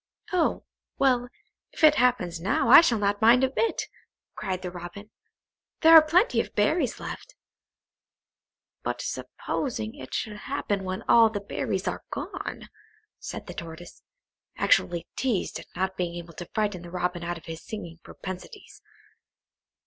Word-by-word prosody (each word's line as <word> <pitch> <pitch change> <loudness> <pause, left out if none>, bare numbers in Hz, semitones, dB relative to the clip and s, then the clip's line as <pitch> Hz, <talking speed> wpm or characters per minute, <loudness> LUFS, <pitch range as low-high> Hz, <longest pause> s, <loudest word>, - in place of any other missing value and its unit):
"Oh, 350 -3 +1 0.3
well, 250 -3 +3 0.5
if - - -8
it 305 -1 +9
happens 240 - +1
now, 215 - +1
I - - +11
shall 245 -9 +2
not 205 0 0
mind 235 +3 +6
a 260 - +2
bit," 455 +11 0 0.5
cried 185 -1 -4
the 180 - -4
Robin; 180 +4 -9 0.7
"there 325 0 +7
are 320 - +12
plenty 345 +8 +3
of - - -10
berries - - +1
left!" - - -8 1.5
"But - - -3
supposing 230 -5 -4
it 290 - -8
should 210 -3 -3
happen 205 -6 -3
when 185 0 -4
all 230 -1 +6
the 210 -2 -3
berries 200 -1 -3
are - - -3
gone?" - - -6 0.5
said - - -7
the - - -8
Tortoise, 170 +1 -9 0.6
actually 170 -1 +2
teased 245 -8 -1
at - - -12
not 190 +1 -2
being 175 -1 -2
able 170 -1 -8
to 175 +1 -9
frighten 205 -4 -1
the 175 - -10
Robin 180 0 -2
out 175 0 -3
of 165 - -14
his 165 -1 -7
singing 170 -6 -8
propensities. 185 - -9
205 Hz, 150 wpm, -26 LUFS, 175-250 Hz, 1.5 s, are